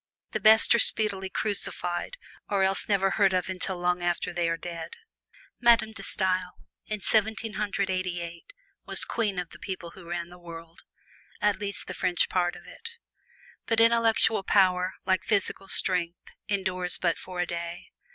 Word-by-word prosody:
The - - -2
best 220 +1 +7
are 235 - +3
speedily 200 -4 +4
crucified, 190 - -2 0.3
or 200 -2 +1
else 190 +2 0
never 195 -1 +2
heard 195 -3 +3
of 185 0 -1
until 185 0 -3
long 180 0 0
after 175 0 -1
they 170 -1 0
are 165 - -1
dead. 170 - -7 0.6
Madame 235 -2 +4
De 220 - -5
Stael, 185 -1 0 0.3
in 215 -1 -4
Seventeen 220 +1 0
Hundred 200 -2 -2
Eighty 185 -1 -2
eight, 170 - -9 0.3
was - - +1
queen 210 -5 -2
of 180 -2 -4
the - - -13
people 180 -3 -6
who 170 -1 -13
ran 170 0 -4
the 180 0 -14
world 165 -1 -11 0.6
at 210 0 +1
least 200 -1 +4
the - - -6
French 180 -1 0
part 175 -1 0
of - - -13
it. 465 +1 -10 0.7
But 225 0 +1
intellectual 230 -2 +4
power, 185 -2 +2
like 190 0 +1
physical 200 -3 -1
strength, 180 -3 -2 0.2
endures 185 -3 -1
but 170 -2 0
for 180 -1 -8
a 180 - +1
day. 170 0 -6
185 Hz, 170 wpm, -27 LUFS, 175-210 Hz, 0.7 s, best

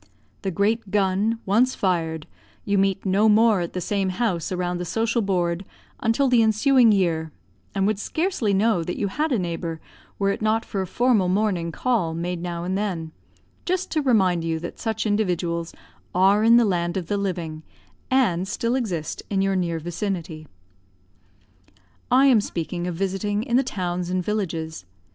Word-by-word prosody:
The 195 - -2
great 205 +3 0
gun, 200 +3 +1
once 235 +7 +3
fired, 165 -4 -1 0.4
you 200 -1 +2
meet 195 0 0
no 200 +3 +3
more 215 -2 +4
at 170 - -4
the 185 - -2
same 195 +1 -1
house 185 -4 -1
around 180 -1 -2
the - - -2
social 225 +6 0
board 180 -3 0 0.4
until 230 +4 +2
the 245 -2 +4
ensuing 225 +2 +4
year, 165 -5 +1 0.4
and 195 -1 +1
would 210 -1 0
scarcely 315 - -1
know 200 -2 +2
that 175 - -4
you 200 - -1
had 305 +9 -1
a 250 - +2
neighbor, 170 -3 -3 0.4
were 200 0 +1
it - - -4
not 220 +1 +1
for 195 - -3
a 190 - -3
formal 230 -4 +2
morning 185 -4 0
call 185 -8 0
made 175 +1 -3
now 170 -1 -4
and 185 +2 -2
then, 180 -6 -3 0.5
just 370 +1 -2
to 310 - +1
remind 190 - +2
you 165 -1 -1
that 170 +2 -7
such 220 -1 -2
individuals 175 -5 -1 0.4
are 195 +3 +4
in 230 +1 +7
the 240 - +5
land 175 -2 0
of 180 - -3
the 205 - -1
living, 175 -6 -3 0.5
and 195 -9 +2
still 230 +4 -1
exist 185 -12 -2
in 195 -1 +1
your 195 0 +1
near 170 -3 0
vicinity. 170 -2 -4 1.6
I 260 +2 +5
am 250 -6 +5
speaking 175 -1 -4
of 175 - -3
visiting 195 +3 -1
in 240 -1 -1
the 260 - +5
towns 180 -7 -3
and 185 -1 -1
villages. 165 - -3
195 Hz, 175 wpm, -23 LUFS, 175-220 Hz, 1.6 s, in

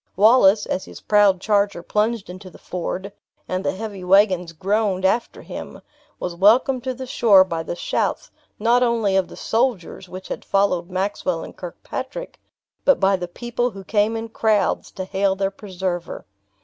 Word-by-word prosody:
Wallace, 210 0 +5
as 185 - -3
his - - -11
proud 205 -3 +4
charger 200 -3 +1
plunged 215 +1 0
into 185 +1 -10
the - - -15
ford, 185 +2 -5 0.3
and 185 +1 -2
the - - 0
heavy 200 -2 -6
wagons 185 -2 +3
groaned 195 +2 0
after 225 +5 0
him, - - -8 0.4
was 180 - -3
welcomed 240 +7 +4
to 260 -1 -2
the 260 +1 -6
shore 210 -6 +5
by 170 -3 -3
the 165 - -5
shouts, - - -2 0.3
not 235 +3 +3
only 230 -5 +2
of 190 -2 +2
the - - -12
soldiers 225 -6 -1
which 185 +1 -9
had - - -5
followed 195 -3 +1
Maxwell 185 -2 -2
and - - -10
Kirkpatrick, 345 - -7 0.4
but 280 - +4
by 195 0 +3
the 180 -1 -4
people 240 +6 -2
who 195 -4 -10
came 210 +3 +1
in 225 0 -5
crowds 220 -2 +1
to 185 - -5
hail 195 0 0
their 195 0 -1
preserver. 185 -3 -5
195 Hz, 170 wpm, -22 LUFS, 185-225 Hz, 0.4 s, Wallace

